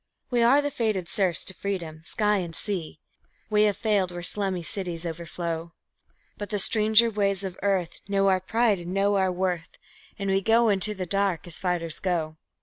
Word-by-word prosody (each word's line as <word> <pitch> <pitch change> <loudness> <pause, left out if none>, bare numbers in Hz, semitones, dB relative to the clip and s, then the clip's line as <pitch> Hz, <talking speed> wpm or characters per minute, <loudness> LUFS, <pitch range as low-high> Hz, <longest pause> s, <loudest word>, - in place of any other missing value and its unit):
We 240 -1 +2
are 265 +5 +5
the 290 - -1
fated 215 -8 -1
serfs 185 -4 +1
to 190 - -3
freedom 175 -6 -4
sky 210 +1 +1
and 170 -3 -2
sea; 180 -7 -2 0.5
We 210 0 +4
have 205 -1 +1
failed 200 -5 +1
where 175 0 -6
slummy 190 -2 -1
cities 175 -1 -3
overflow; 170 0 -5 0.7
But 205 -1 -5
the 210 - -1
stranger 220 +3 +4
ways 200 -2 0
of 190 -2 -5
earth 190 -4 -1
know 195 -1 +2
our 190 -1 +3
pride 220 0 +1
and 175 +2 -6
know 200 +1 +2
our 190 -1 +2
worth, 180 -2 -3 0.4
And 195 -1 -2
we 195 0 +2
go 225 +2 +4
into 205 +1 +2
the 185 -1 -4
dark 195 -1 0
as 175 -3 -7
fighters 175 -3 -1
go. 160 -4 -2
195 Hz, 185 wpm, -26 LUFS, 175-210 Hz, 0.7 s, are